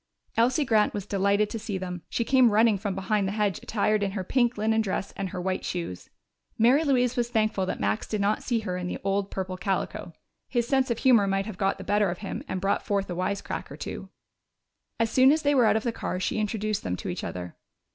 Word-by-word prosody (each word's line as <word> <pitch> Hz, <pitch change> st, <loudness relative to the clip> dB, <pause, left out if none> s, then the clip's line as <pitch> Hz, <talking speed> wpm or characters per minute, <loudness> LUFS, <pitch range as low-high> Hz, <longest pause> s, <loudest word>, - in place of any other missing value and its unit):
Elsie 250 Hz, +6 st, +3 dB
Grant 215 Hz, -4 st, +2 dB
was 200 Hz, -2 st, -4 dB
delighted 200 Hz, +1 st, +2 dB
to 225 Hz, -, -3 dB
see 205 Hz, -2 st, -4 dB
them. 180 Hz, -2 st, -5 dB
She 235 Hz, -, 0 dB
came 255 Hz, 0 st, +5 dB
running 215 Hz, -1 st, +4 dB
from 200 Hz, -1 st, -3 dB
behind 195 Hz, +1 st, 0 dB
the 195 Hz, -, -2 dB
hedge 205 Hz, -3 st, 0 dB
attired 215 Hz, -1 st, +1 dB
in 195 Hz, -1 st, -1 dB
her 195 Hz, -3 st, -3 dB
pink 240 Hz, +3 st, +1 dB
linen 220 Hz, +1 st, +2 dB
dress 195 Hz, -1 st, -3 dB
and 195 Hz, -1 st, -3 dB
her 185 Hz, -, -5 dB
white 185 Hz, +1 st, -2 dB
shoes. 170 Hz, -, -5 dB, 0.5 s
Mary 250 Hz, +7 st, +5 dB
Louise 250 Hz, -4 st, +2 dB
was 240 Hz, -2 st, 0 dB
thankful 215 Hz, -4 st, +1 dB
that -, -, -3 dB
Max 100 Hz, +1 st, -1 dB
did 215 Hz, -, -2 dB
not 200 Hz, +2 st, +1 dB
see 235 Hz, -3 st, -1 dB
her 180 Hz, -4 st, -3 dB
in 180 Hz, 0 st, -4 dB
the -, -, -3 dB
old 195 Hz, 0 st, 0 dB
purple 185 Hz, -1 st, -4 dB
calico. 190 Hz, +1 st, -2 dB, 0.4 s
His 240 Hz, -2 st, 0 dB
sense 265 Hz, -1 st, +2 dB
of 235 Hz, -, 0 dB
humor 235 Hz, -6 st, +4 dB
might 195 Hz, 0 st, 0 dB
have 210 Hz, -3 st, -7 dB
got 195 Hz, 0 st, +1 dB
the -, -, -8 dB
better 205 Hz, -1 st, +2 dB
of 175 Hz, -, -3 dB
him -, -, -4 dB
and 185 Hz, -, -3 dB
brought 195 Hz, +2 st, 0 dB
forth 200 Hz, -2 st, -1 dB
a -, -, -3 dB
wisecrack 185 Hz, +3 st, -3 dB
or -, -, -8 dB
two. -, -, -6 dB, 0.9 s
As 230 Hz, 0 st, +1 dB
soon 260 Hz, +1 st, +6 dB
as 310 Hz, +1 st, +1 dB
they 290 Hz, 0 st, +3 dB
were 255 Hz, -4 st, +5 dB
out 220 Hz, -, +4 dB
of 220 Hz, -, -3 dB
the 235 Hz, -, 0 dB
car 185 Hz, -4 st, -4 dB
she 190 Hz, -, -1 dB
introduced 215 Hz, 0 st, -1 dB
them 90 Hz, -, -2 dB
to -, -, -7 dB
each 90 Hz, -, -4 dB
other. 90 Hz, -1 st, -6 dB
205 Hz, 240 wpm, -27 LUFS, 190-230 Hz, 0.9 s, soon